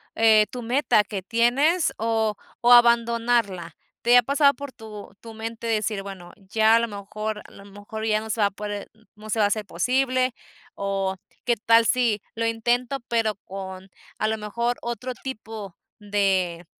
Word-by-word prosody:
eh, 220 -1 +5
tu 250 - -6
meta 240 -2 +2
que 205 -1 -5
tienes 260 - +2
o 220 -1 0 0.3
o 240 +1 +6
abandonarla? 235 -7 +3 0.3
¿Te 240 +1 +6
ha - - +7
pasado 280 +2 +4
por 285 +1 -8
tu 215 -5 -11
tu 225 -1 -10
mente 225 +1 -6
decir: 215 -2 -1
"Bueno, 190 -3 -9
ya 220 +2 +3
a - - +5
lo 235 - 0
mejor 210 +1 -5
a - - -15
lo 195 - -14
mejor 205 +2 -7
ya 215 -1 +2
no 220 - -8
se 220 - -2
va 205 - +5
a - - -6
poder, 205 0 -6
m- 220 0 -27
no 215 +1 -12
se 220 - -1
va 210 - +5
a - - +4
hacer 210 0 -1
posible?, 255 +6 +1 0.4
o 195 -1 -2 0.3
qué 240 -1 +3
tal 230 +2 +4
si 235 -4 +2
lo 230 0 -1
intento, 240 +4 0
pero, 225 -3 +1
con 190 0 -8 0.3
a 215 - +1
lo 220 0 -1
mejor, 235 +3 -2
otro 240 +2 -4
tipo 220 -7 -8 0.2
de 190 -4 0
220 Hz, 180 wpm, -24 LUFS, 205-235 Hz, 0.4 s, ha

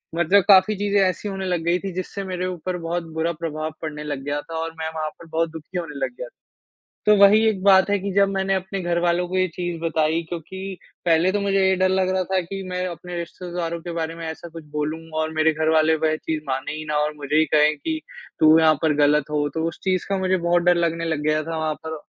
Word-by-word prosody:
मतलब 175 +3 +4
काफ़ी 195 +1 +6
चीज़ें 205 0 +1
ऐसी 185 +2 0
होने 195 -1 -4
लग 180 -2 -1
गई 175 +1 +2
थीं, 195 -1 -5
जिससे 185 +2 -5
मेरे 185 -1 -3
ऊपर 180 0 -4
बहुत 175 0 -1
बुरा 160 +1 0
प्रभाव 155 -1 -3
पड़ने 150 -1 -5
लग 145 -2 -4
गया 145 0 -2
था 165 +2 -9
और 165 0 -3
मैं 160 0 -2
वहाँ 155 -1 -2
पर 165 - -13
बहुत 165 +1 0
दुखी 165 +3 -8
होने 155 -4 -6
लग - - -5
गया - - -6
था। - - -21 0.7
तो 210 - +7
वही 205 +3 +6
एक 200 -4 -3
बात 190 -1 +6
है 205 - +3
कि 200 +1 -3
जब 200 0 +4
मैंने 195 0 0
अपने 190 +1 -3
घरवालों 175 0 +1
को 185 - -1
ये 185 - +3
चीज़ 175 -2 -3
बताई, 160 0 +1
क्योंकि 190 +3 -6 0.3
पहले 170 +2 +4
तो 205 - 0
मुझे 195 -1 +1
ये 190 - +3
डर 185 0 +2
लग 190 0 +1
रहा 185 0 +1
था 190 - +3
कि 195 +3 -6
मैं 180 0 -2
अपने 175 0 -7
रिश्तेदारों 170 0 -4
के 175 0 -6
बारे 165 -1 -3
में 165 0 -7
ऐसा 160 +2 -7
कुछ 165 -1 -8
बोलूँगा 155 +1 -3
और 155 0 -2
मेरे 155 0 +3
घरवाले 160 0 +3
वह 155 0 +2
चीज़ 155 -1 -3
मानें 135 +2 -2
ही 155 0 -6
ना 150 -1 -1
और 150 0 0
मुझे 145 0 -3
ही 160 0 +5
कहें 150 0 +5
कि, 315 - -3 0.4
"तू 155 0 +7
यहाँ 155 -1 +5
पर 155 -2 +3
गलत 150 0 +2
हो।" 145 -1 +1
तो 160 - -1
उस - - -12
चीज़ 185 -2 0
का 195 - +1
मुझे 185 0 +1
बहुत 175 0 +2
डर 175 0 +5
लगने 165 0 -2
लग 160 -3 -1
गया 155 0 +2
था 165 +1 -4
वहाँ 155 -1 -1
पर। 160 -1 -5
170 Hz, 250 wpm, -23 LUFS, 155-185 Hz, 0.7 s, तो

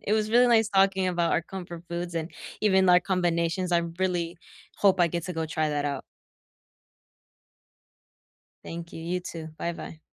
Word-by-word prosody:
It 210 - -1
was 215 0 +1
really 245 +2 +6
nice 225 -2 +4
talking 195 -2 +3
about 175 -2 +1
our 165 - +2
comfort 175 -2 -8
foods 175 0 -4
and 165 +1 -3 0.3
even 190 -3 +4
our 180 0 +7
combinations. 175 -1 0
I 170 - +5 0.2
really 175 -2 -1 0.4
hope 195 -2 +4
I 175 - +6
get 170 0 -3
to 180 - -4
go 160 -1 -2
try 155 -1 0
that 145 -1 -1
out. 140 -2 -2 2.6
Thank 170 0 -7
you, - - -7
you 180 +2 -2
too. 165 -2 -7
Bye-bye. 165 -2 -5
175 Hz, 165 wpm, -27 LUFS, 165-190 Hz, 2.6 s, our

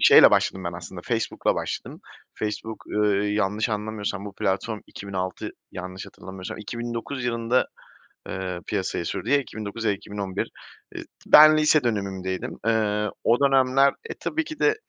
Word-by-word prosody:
şeyle - - +9
başladım 95 -1 +1
ben 85 - -2
aslında, 90 +1 -8
Facebook'la 115 -2 0
başladım. - - -4 0.3
Facebook, 110 +1 -4
ııı, 105 -1 +1
yanlış 105 +2 0
anlamıyorsam 105 -2 -3
bu 100 -1 -8
platform 105 +4 -1
2006, 95 -2 -4 0.2
yanlış 90 +1 -6
hatırlamıyorsam 95 -1 -8
2009 120 +4 -4
yılında, 115 +1 +1 0.6
ııı, 90 -1 -4
piyasaya 95 -4 -2
sürdü. - - -3
Ya 145 - +6
2009 110 -4 -5
ya 110 - +3
da - - +2
2011, 100 -1 -4 0.5
ııı, - - -6 0.2
ben 155 +1 +9
lise 155 -2 +4
dönemimdeydim. 95 -4 -2
Iıı, 105 -2 +1
o 120 +3 +4
dönemler, 135 0 +4 0.2
e, - - -3
tabii 320 +1 -1
ki 310 0 -8
de 430 +6 +4
105 Hz, 145 wpm, -25 LUFS, 95-120 Hz, 0.6 s, şeyle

